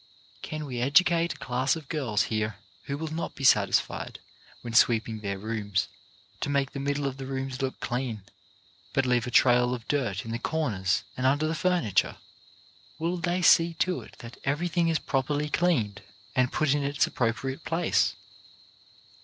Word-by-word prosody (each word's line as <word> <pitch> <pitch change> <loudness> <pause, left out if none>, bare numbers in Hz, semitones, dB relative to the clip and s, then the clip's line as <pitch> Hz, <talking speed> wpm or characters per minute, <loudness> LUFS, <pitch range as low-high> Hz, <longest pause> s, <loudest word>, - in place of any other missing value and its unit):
Can 155 -1 -5
we 125 -4 -4
educate 170 +5 +4
a - - -15
class 130 +3 0
of 160 -4 -9
girls 130 -10 0
here 110 -1 -1 0.3
who 140 - -3
will 155 0 -5
not 165 - -4
be 140 - -8
satis 105 -7 +5
fied - - -7 0.4
when 120 -1 -7
sweeping 115 -1 +3
their 100 -2 -3
rooms 105 -2 -2 0.5
to 145 - -2
make 140 -2 +1
the 140 - -5
mid 140 +1 -1
dle 145 0 -2
of 135 -1 -2
the 135 -1 -6
rooms 135 -1 -4
look 130 -1 -3
clean, 120 -4 -3 0.7
but 135 -2 +2
leave 125 -1 +1
a - - -2
trail 125 0 +4
of 115 -2 -11
dirt 120 -10 -1
in 115 - -5
the 115 - -2
corners 110 -15 0
and 130 0 +1
under 145 +3 +2
the 160 - -1
furniture? 165 - +1 0.8
Will 170 +3 -1
they 175 +2 -1
see 165 0 +5
to 180 +3 0
it - - -14
that 115 0 -11
everything 170 +4 0
is 165 -1 +2
properly 145 +2 -1
cleaned 120 - +1 0.3
and 130 -1 +2
put 150 -3 +2
in 145 - +1
its 140 0 +2
appropriate 130 +3 -2
place? 165 +1 +1
135 Hz, 180 wpm, -27 LUFS, 115-155 Hz, 0.8 s, satis